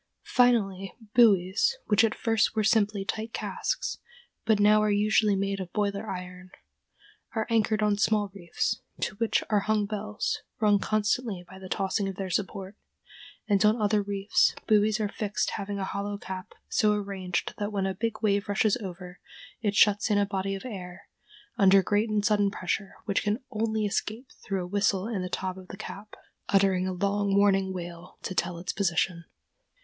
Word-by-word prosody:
Finally, 195 -6 +2 0.2
buoys, 225 - +4
which 210 +2 +4
at 225 - +2
first 225 -1 +1
were 215 - +2
simply 210 -2 +2
tight 220 +2 -4
casks, - - -3 0.5
but 220 -2 +3
now 210 +1 +5
are 215 - +2
usually 210 0 +3
made 195 0 -1
of 180 -2 -6
boiler 205 0 -1
iron, 180 0 -7 0.9
are 220 -1 0
anchored 220 -1 +2
on 210 -1 +3
small 210 -2 +2
reefs, 175 -4 -2 0.2
to - - -1
which 230 0 +1
are 210 - +4
hung 215 0 +1
bells, 210 +1 -3 0.2
rung 210 -2 +4
constantly 215 -2 -1
by 190 - -12
the 190 -1 -9
tossing 195 +1 0
of 190 - -6
their 190 0 -4
support; 195 +1 -3 0.7
and 205 -1 +3
on 215 +2 +4
other 210 0 +2
reefs 200 0 +1
buoys 215 0 +3
are 215 - +1
fixed 210 0 -2
having 200 -1 -4
a 195 - -2
hollow 200 +1 -3
cap 185 -2 -7
so 210 -1 +3
arranged 195 -3 -3
that 205 0 -2
when 195 -2 -1
a 190 - -1
big 225 +3 -3
wave 205 0 +1
rushes 205 +1 +2
over, 180 -4 -8 0.4
it 205 -2 0
shuts 205 +1 +4
in 205 - +3
a 205 - +3
body 195 0 -2
of 195 - -8
air, 185 -5 -8 0.5
under 195 -1 +6
great 210 +3 +1
and 210 -1 0
sudden 205 -2 +3
pressure, 195 +1 -3
which 200 -1 +1
can 210 +1 0
only 220 -1 0
escape 220 +5 -3
through 195 -3 -2
a - - -6
whistle 200 0 +1
in 220 -5 -2
the 180 - -4
top 185 +1 -3
of 185 -1 -11
the 195 - -9
cap, 210 0 -9 0.3
uttering 190 -2 +3
a - - -1
long 200 +2 0
warning 195 -1 +3
wail 175 -1 -8
to - - -3
tell 175 -1 -1
its 175 +2 -4
position. 170 -2 0
200 Hz, 180 wpm, -28 LUFS, 190-215 Hz, 0.9 s, under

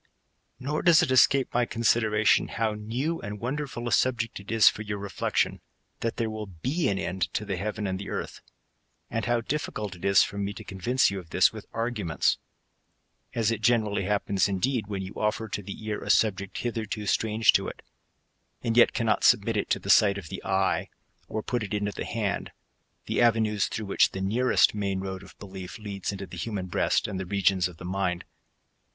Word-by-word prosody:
^ - - -47 0.6
Nor 150 +4 -2
does 170 -2 +6
it 145 - 0
escape 130 +1 +4
my 120 0 +2
consideration, 110 -2 +2
how 110 -1 -1
new 120 +10 -3
and 105 0 -6
wonder 140 +6 -2
ful 120 -2 -6
a - - -2
subject 120 -4 +1
it 100 +2 -9
is 110 -1 +5
for - - +4
your 105 -1 -4
reflection, 100 0 -1 0.4
that 115 - -2
there 115 -2 0
will 110 -1 -5
be 130 - -1
an 100 - 0
end 95 -1 -2
to 105 - -1
the 100 -2 -2
heaven 105 +3 -3
and 95 -1 -2
the 100 - -6
earth; - - -5 0.7
and 115 -1 -1
how 120 -1 +1
diflicult 110 -7 -3
it 90 - -15
is 100 0 +5
for 100 0 -5
me 100 0 -2
to - - -9
convince 100 +6 +1
j^mt 100 - -3
of 85 -3 -13
this - - +4
with - - -9
arguments; 110 -8 0 1.0
as 115 -1 +2
it 110 -2 -2
generally 110 -4 +2
happens, 100 -1 +1
indeed, 110 +3 0
when 100 -2 -3
you 95 - -7
offer 110 +1 -1
to 105 - -4
the 100 +2 -8
ear 105 -1 -3
a - - -7
subject 100 -2 +2
hitherto 115 -2 -3
strange 110 +2 +3
to - - +1
it, - - -8 0.8
and 115 0 0
yet 120 - +6
cannot 115 -3 +1
submit - - +4
it - - -1
to - - +2
the - - 0
sight 100 -2 +5
of 90 -6 -8
the - - -7
eye, 95 0 0 0.4
or 110 0 -4
put 120 -1 -1
it 105 0 -3
into 105 0 -1
the - - -5
hand; 105 -4 -2 0.6
the - - 0
avenues 110 -3 +3
through 110 - -4
which 100 - +3
the 95 - -4
nearest 115 +7 +3
main 100 -2 -2
road* 95 0 -5
of 100 - -15
belief 95 -1 -8
leads 100 -3 -4
into 100 -1 -6
the 90 - -10
human 100 -1 -3
breast 90 - +1
and 100 -3 -4
the 95 - -3
regions 95 -1 +2
of 90 -2 -12
the 85 - -9
mind. 90 -1 -2
105 Hz, 205 wpm, -27 LUFS, 100-115 Hz, 1.0 s, does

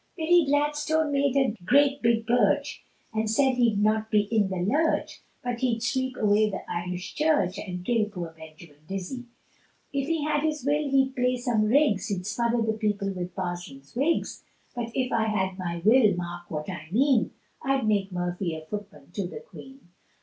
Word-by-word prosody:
Billy 340 0 +4
Gladstone 295 +2 +1
made 280 -1 +2
a 265 -5 +2
great 280 +6 +4
big 230 -1 +2
birch, 235 +3 +1 0.3
And 220 0 0
said 265 +4 +3
he'd 235 -4 +2
not 215 +1 +1
be 210 -2 +4
in 205 -1 +1
the 190 - -3
lurch, 280 - 0 0.2
But 245 -1 -2
he'd 235 -3 0
sweep 260 +1 -1
away 215 0 +3
the 195 - -5
Irish 180 +1 -4
Church, 250 - +1
And 180 -3 -6
kill 230 -1 +2
poor 175 -6 -7
Benjamin 160 -1 -14
Dizzy. 195 +6 -5 0.7
If 275 0 -1
he 325 -2 0
had 300 -1 +1
his 305 -4 -2
will 290 0 +1
he'd 265 -1 +2
play 250 -1 +1
some 240 -3 +1
rigs, 225 -5 +3
He'd 190 -4 -3
smother 235 +2 0
the 220 0 0
people 210 -2 -1
with 180 -1 -5
Parsons' 175 -7 -6
wigs; 290 +7 0 0.3
But 235 -1 -4
if 255 -1 0
I 225 -1 +2
had 190 -3 -1
my 170 -2 -4
will, 220 -3 +6
mark 175 0 -6
what 150 -1 -4
I 155 - -6
mean, 255 +2 +3 0.3
I'd 270 -4 0
make 200 -2 +1
Murphy 175 -1 -2
a 155 0 -8
footman 185 -7 -8
to 190 0 -3
the 320 - -8
Queen. 270 - -14
220 Hz, 180 wpm, -27 LUFS, 185-265 Hz, 0.7 s, will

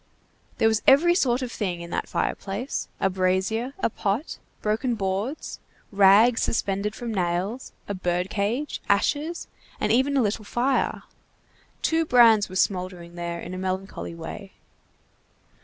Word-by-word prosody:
There 225 - +4
was 220 0 +2
every 320 +6 +6
sort 260 -7 +1
of 245 - -4
thing 180 -7 -3
in 170 0 -8
that - - -3
fireplace, 205 +8 -3
a - - +2
brazier, 190 +7 0
a 385 - 0
pot, 210 +11 -2 0.2
broken 225 +3 0
boards, 200 +7 -3 0.3
rags 205 +4 +5
suspended 205 -1 -1
from 235 -2 -5
nails, 185 +6 -2 0.2
a 205 - -2
bird 180 -1 -1
cage, 230 +9 -2
ashes, 295 +11 0 0.3
and - - +1
even 265 +4 +3
a 260 - +4
little 215 +1 -1
fire. 245 +6 0 0.8
Two 325 0 +2
brands 230 -8 +5
were 185 - -9
smouldering 180 -3 -1
there 170 0 -4
in 175 - -7
a 185 - -5
melancholy 190 -2 -4
way. 170 +4 -8
205 Hz, 140 wpm, -25 LUFS, 185-245 Hz, 0.8 s, every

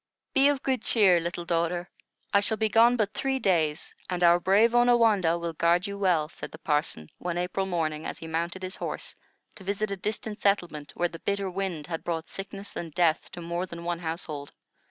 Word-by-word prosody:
"Be 270 +1 +5
of 285 -2 +1
good 260 -4 0
cheer, 195 -8 +5
little 170 +1 -4
daughter; 170 +1 0 0.5
I 200 - +7
shall 215 +2 -1
be 220 0 +1
gone 235 +4 +5
but 215 -2 0
three 270 +3 0
days, 165 -9 +1 0.2
and 180 -1 -1
our 175 0 +6
brave 205 +6 +4
Onawandah 230 -8 +4
will 170 -1 -4
guard 170 +3 +2
you 200 -1 -4
well," 180 -6 +2
said 160 - -8
the - - -10
parson, 150 - -1
one 175 -1 -3
April 180 +2 -1
morning, 160 -4 -1
as - - -5
he - - -9
mounted 170 +3 -3
his 185 +1 -4
horse - - -4 0.4
to 195 - -13
visit 200 +2 -2
a - - -1
distant 210 +2 -4
settlement, 175 -7 0
where 175 0 +1
the 165 - -9
bitter 200 0 -1
winter 180 -5 -4
had 165 - -3
brought 165 -2 -3
sickness 195 +1 -7
and 165 -3 -6
death 170 -2 +2
to 175 - -7
more 170 +2 -3
than 170 -1 -8
one 170 0 -2
household. 160 -4 -5
180 Hz, 205 wpm, -27 LUFS, 170-200 Hz, 0.5 s, I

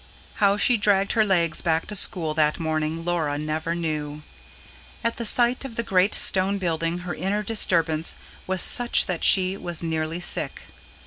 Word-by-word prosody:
How 200 0 +3
she 240 +3 +3
dragged 200 -1 +1
her 220 - +3
legs 175 -5 +1
back 160 -1 0
to 210 - -6
school 170 -5 +1
that 155 -1 0
morning, 160 0 -3
Laura 160 -5 -1
never 155 +2 -3
knew. 150 -3 -4 0.8
At 230 - -1
the 235 - -2
sight 245 +4 +1
of 265 -4 -8
the 230 - -2
great 190 -1 +2
stone 195 +1 +2
building 170 -1 -2
her 175 - -4
inner 195 +6 -2
disturbance 165 -7 +1 0.3
was 185 -1 -2
such 240 -1 +4
that 180 -4 -4
she 190 0 +4
was 175 -3 -5
nearly 160 0 -3
sick. 175 - -3
175 Hz, 170 wpm, -23 LUFS, 160-200 Hz, 0.8 s, such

